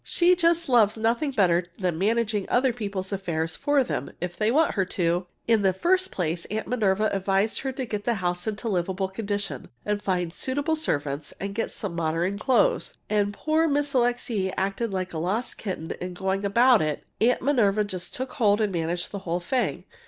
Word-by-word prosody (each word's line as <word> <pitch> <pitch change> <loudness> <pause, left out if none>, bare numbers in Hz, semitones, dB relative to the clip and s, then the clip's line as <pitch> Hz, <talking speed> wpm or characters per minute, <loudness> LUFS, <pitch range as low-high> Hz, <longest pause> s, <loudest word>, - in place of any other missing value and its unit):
She 355 +1 +3
just 335 -1 +2
loves 230 -5 +4
nothing 230 +6 +1
better 185 -8 +3
than 180 -4 -1
managing 215 0 +1 0.3
people's 200 -4 -4
affairs 165 -4 -2
for 290 -2 +2
them 250 - -3
if 175 0 -4
they 215 0 +1
want 305 +6 +3
her 195 - +1
to! 180 -1 0 0.2
In 225 -2 +4
the 190 -1 +3
first 370 - +2
place, 170 -1 -2
Aunt 215 +1 -4
Minerva 215 -3 +1
advised 195 +2 +1
her 270 - -2
to 260 0 -3
get 210 -3 -4
the 235 - +2
house 180 0 -2
into 220 +2 -3
livable 190 -1 -1
condition, 200 - -4 0.2
and 210 0 -1
find 180 -4 -1
suitable 285 - -1
servants, 145 - -2
and 200 0 -4
get 225 - -1
some 195 -5 -5
modern 170 +4 -1
clothes. 270 - +2 0.2
And 205 -1 +3
as - - -22
poor 315 +1 +3
Miss 290 -1 +1
Alixe 240 -5 +1
acted 195 +4 -1
like 185 -2 -3
a 160 - -2
lost 200 +9 -2
kitten 185 -6 -4
in 180 0 -5
going 190 +2 -1
about 235 +3 +5
it, 155 -1 -2 0.2
Aunt 245 +3 +3
Minerva 215 -7 +3
just 185 -4 -5
took 260 0 -4
hold 210 -7 +3
and 210 -3 0
managed 170 +1 -2
the 200 - -4
whole 175 -2 -2
thing. 245 +9 -1
205 Hz, 190 wpm, -26 LUFS, 180-240 Hz, 0.3 s, about